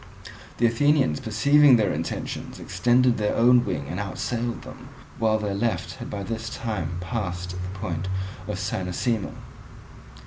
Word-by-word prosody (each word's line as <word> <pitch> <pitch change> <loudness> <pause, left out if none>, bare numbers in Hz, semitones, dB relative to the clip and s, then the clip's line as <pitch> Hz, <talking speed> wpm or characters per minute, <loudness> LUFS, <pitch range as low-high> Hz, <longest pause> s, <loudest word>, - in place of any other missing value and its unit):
The 120 - +3
Athenians 135 - +3
perceiving 140 +5 +5
their 105 -5 +2
intention - - -4
extended 125 -1 +2
their 105 -1 +1
own 120 +1 +6
wing 80 -10 -3
and 90 - -4
outsailed 120 +4 -3
them, 130 0 -11 0.3
while 110 -1 +3
their 105 -2 -2
left 110 +3 -1
had - - -7
by 100 -1 -4
this 115 +2 -4
time 95 -10 -3
passed 90 -3 -3
the 90 +1 -6
point 95 -2 -3 0.4
of 105 -3 -3
Cynossema. 95 +3 -2
110 Hz, 140 wpm, -25 LUFS, 95-120 Hz, 0.4 s, own